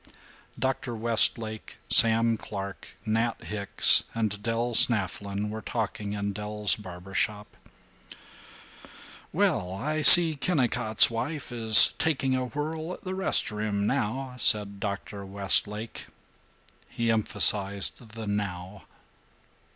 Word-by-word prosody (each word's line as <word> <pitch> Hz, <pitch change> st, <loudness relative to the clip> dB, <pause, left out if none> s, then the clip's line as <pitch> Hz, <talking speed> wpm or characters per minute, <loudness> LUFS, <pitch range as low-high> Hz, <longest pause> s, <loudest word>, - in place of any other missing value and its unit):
III -, -, -24 dB, 0.4 s
Dr. 130 Hz, -2 st, -4 dB
Westlake, 110 Hz, -1 st, -1 dB
Sam 115 Hz, 0 st, +4 dB
Clark, 100 Hz, -3 st, -9 dB
Nat 115 Hz, +1 st, -2 dB
Hicks, 105 Hz, -2 st, +3 dB
and 105 Hz, -3 st, -3 dB
Del 115 Hz, +2 st, -3 dB
Snafflin 100 Hz, -2 st, 0 dB
were 110 Hz, +1 st, -7 dB
talking 105 Hz, -3 st, -5 dB
in 100 Hz, -1 st, -4 dB
Del's 105 Hz, 0 st, 0 dB
barber 95 Hz, -2 st, -12 dB
shop. 105 Hz, +1 st, -4 dB, 1.8 s
"Well, 90 Hz, 0 st, -1 dB
I 155 Hz, +11 st, -4 dB
see 165 Hz, 0 st, +9 dB
Kennicott's 125 Hz, -8 st, +1 dB
wife 130 Hz, +6 st, -6 dB
is 110 Hz, -3 st, +7 dB
taking 135 Hz, -4 st, -1 dB
a 130 Hz, 0 st, -3 dB
whirl 155 Hz, +5 st, -6 dB
at -, -, -13 dB
the 185 Hz, -, -6 dB
rest 190 Hz, -, -1 dB
room, 105 Hz, -1 st, -4 dB
now," 130 Hz, +6 st, -3 dB
said 105 Hz, -2 st, +2 dB
Dr. 100 Hz, 0 st, -7 dB
Westlake. 100 Hz, +3 st, -2 dB, 0.8 s
He 115 Hz, -1 st, -2 dB
emphasized 105 Hz, 0 st, -2 dB
the 115 Hz, -1 st, -8 dB
"now." 100 Hz, -2 st, -6 dB
110 Hz, 110 wpm, -25 LUFS, 100-120 Hz, 1.8 s, see